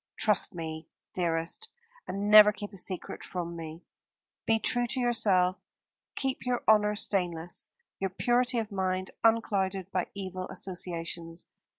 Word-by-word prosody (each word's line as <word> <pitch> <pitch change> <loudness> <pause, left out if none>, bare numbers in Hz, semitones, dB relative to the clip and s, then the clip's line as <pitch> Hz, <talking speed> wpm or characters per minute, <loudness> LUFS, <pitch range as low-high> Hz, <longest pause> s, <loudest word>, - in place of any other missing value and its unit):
Trust 210 -4 +2
me, 160 -1 -6 0.3
dearest, 170 - -1 0.4
and 200 +1 -3
never 210 0 +10
keep 205 0 -8
a - - -10
secret 185 0 -3
from 170 -1 -4
me. 165 0 -8 0.6
Be 225 - +4
true 245 +2 +1
to 260 +2 -2
yourself, 195 -7 +3 0.6
keep 265 -1 -2
your 250 -1 -1
honour 210 -1 +5
stainless, 175 -5 0 0.3
your 195 - -1
purity 245 +5 +1
of 220 -2 -2
mind 185 -1 -1
unclouded 195 -4 +1
by 185 -1 -1
evil 185 -2 -5
associations. 170 -2 -4
190 Hz, 130 wpm, -29 LUFS, 175-215 Hz, 0.6 s, never